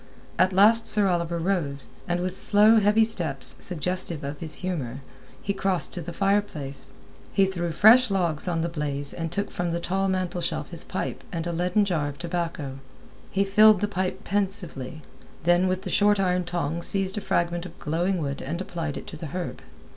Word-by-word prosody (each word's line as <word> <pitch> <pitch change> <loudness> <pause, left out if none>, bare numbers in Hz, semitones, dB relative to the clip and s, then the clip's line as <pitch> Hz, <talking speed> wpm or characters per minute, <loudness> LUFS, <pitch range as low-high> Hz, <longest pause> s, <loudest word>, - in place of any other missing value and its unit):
At 185 +1 +4
last 215 +4 +5
Sir 210 -2 +3
Oliver 170 -2 0
rose, 165 -6 -2 0.2
and 175 0 0
with 185 0 -2
slow, 215 +1 +6
heavy 210 +2 +4
steps, 170 -11 0
suggestive 180 -2 -2
of 140 +1 -5
his 160 -2 -4
humour, 140 -8 -3 0.4
he 200 - 0
crossed 190 -2 0
to 180 - -3
the 170 +2 -6
fire 200 +3 +2
place. 140 -9 -8 0.4
He 195 - +4
threw 175 -3 -2
fresh 225 +8 +6
logs 175 -5 0
on 170 -2 0
the 170 - 0
blaze, 145 -3 -2
and 165 -2 -4
took 200 0 -2
from 175 -1 -2
the 170 - -1
tall 190 +3 -1
mantelshelf 185 -2 -2
his - - -6
pipe - - -4
and 165 -3 -3
a 175 - -2
leaden 180 +5 +2
jar 165 -7 0
of 140 - -9
tobacco. 165 -5 -4 0.5
He 195 - +1
filled 210 +1 +6
the 205 - 0
pipe 185 -2 -3
pensively, 185 - -3 0.4
then 175 +2 +4
with 185 0 -1
the - - -4
short 205 0 +4
iron 180 -1 +1
tongs 170 -1 -1
seized 195 +1 0
a - - -10
fragment 170 -1 -1
of 165 - -15
glowing 175 +5 -1
wood 140 -4 -3
and 165 +6 -4
applied 165 -5 -4
it - - -8
to 155 - -9
the 160 - -6
herb. 175 +3 -5
175 Hz, 190 wpm, -25 LUFS, 165-195 Hz, 0.5 s, slow